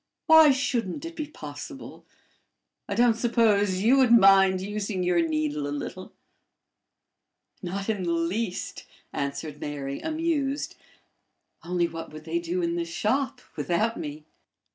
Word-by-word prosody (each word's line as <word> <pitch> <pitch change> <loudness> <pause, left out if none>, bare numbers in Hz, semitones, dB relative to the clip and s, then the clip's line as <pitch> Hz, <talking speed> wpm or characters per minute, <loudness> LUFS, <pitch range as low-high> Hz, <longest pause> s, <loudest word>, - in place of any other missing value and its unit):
Why 320 -1 +8
shouldn't 260 - -1
it 335 0 -7
be 305 -2 -4
possible? 150 - -9 0.8
I 200 - -1
don't 240 +1 +5
suppose 210 -5 +2
you 250 +5 +5
would 260 -3 +4
mind 195 -4 +6
using 200 -1 -3
your 175 -1 +2
needle 155 -2 -1
a - - -4
little?" 145 0 -6 1.5
"Not 195 +2 -4
in 215 -3 -1
the 175 -2 -1
least," 180 +5 -2 0.3
answered 145 +1 -4
Mary, 140 -2 -4
amused. 310 -3 -1 0.9
"Only 175 0 0
what 165 -1 -8
would 155 0 -10
they 165 +1 -1
do 175 +1 -2
in 170 0 -1
the 170 - 0
shop 250 +9 -1
without 215 +7 0
me?" 150 +1 -7
190 Hz, 135 wpm, -26 LUFS, 165-235 Hz, 1.5 s, Why